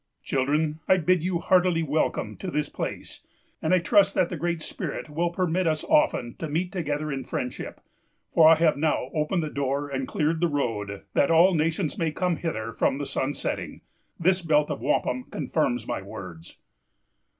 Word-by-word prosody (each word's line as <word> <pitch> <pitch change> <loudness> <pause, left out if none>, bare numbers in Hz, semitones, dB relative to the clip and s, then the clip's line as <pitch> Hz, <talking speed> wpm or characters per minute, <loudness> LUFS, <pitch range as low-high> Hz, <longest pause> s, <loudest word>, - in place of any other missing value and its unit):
"Children, 150 +4 0
I 190 - +5
bid 180 0 +2
you 180 -1 0
heartily 180 -1 +3
welcome 155 +1 -1
to 190 - -5
this 150 -3 -1
place; - - -5 0.4
and 160 - 0
I 185 - +6
trust 195 +2 +3
that 180 - +2
the - - -4
Great 170 0 -2
Spirit 155 - -5
will 170 +3 0
permit 180 0 0
us 155 -1 0
often 300 - +2
to 160 - -4
meet 175 +4 -1
together 155 -4 -2
in 135 -1 -3
friendship, 125 0 -5 0.5
for 160 -2 +7
I 165 - +8
have 160 -2 +2
now 145 -3 0
opened 160 +3 0
the 155 - -4
door 140 +1 -1
and 135 -1 -3
cleared 160 +2 0
the 175 - +4
road, 110 -9 -2
that 140 - +3
all 170 +3 +6
nations 160 0 0
may 165 -2 +1
come 180 +1 -1
hither 115 -10 -3
from 130 - +1
the 145 - -3
sunsetting. 135 +1 -3 0.4
This 185 +2 +3
belt 150 -2 +2
of 140 - -4
wampum 125 -2 0
confirms 125 -7 -1
my - - -2
words. 90 -4 -10
155 Hz, 180 wpm, -26 LUFS, 140-175 Hz, 0.5 s, I